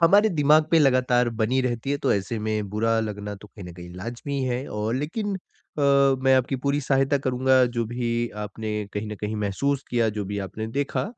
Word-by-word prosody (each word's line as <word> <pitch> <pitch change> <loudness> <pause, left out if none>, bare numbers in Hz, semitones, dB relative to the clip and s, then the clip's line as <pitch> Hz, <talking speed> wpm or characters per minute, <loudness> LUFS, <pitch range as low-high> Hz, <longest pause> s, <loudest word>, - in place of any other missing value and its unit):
हमारे 200 +6 +6
दिमाग़ 155 -2 +4
पे 165 - +6
लगातार 125 -3 +3
बनी 125 +4 +2
रहती 125 +1 -2
है, 145 - +1
तो 135 - +1
ऐसे 100 +3 -2
में 105 -1 -2
बुरा 115 +2 +1
लगना 105 -1 -4
तो 100 +1 -13
कहीं 100 -2 -12
न - - -9
कहीं 90 0 -10
लाज़मी 120 +8 -4
है। 125 +1 -2
और 105 +2 -2
लेकिन 195 - -2
अ, 180 -4 -10 0.4
मैं 130 0 +5
आपकी 130 +1 0
पूरी 140 +1 +1
सहायता 135 +1 +2
करूँगा 130 0 +3
जो 120 -1 -1
भी 120 0 -1
आपने, 105 0 -4
कहीं 105 +1 -3
न - - -4
कहीं 105 +1 -3
महसूस 130 +7 -1
किया, 120 -2 +2
जो 105 -1 -3
भी 100 +1 -4
आपने 100 +3 -5
देखा, 140 +5 -1
120 Hz, 205 wpm, -25 LUFS, 105-135 Hz, 0.4 s, हमारे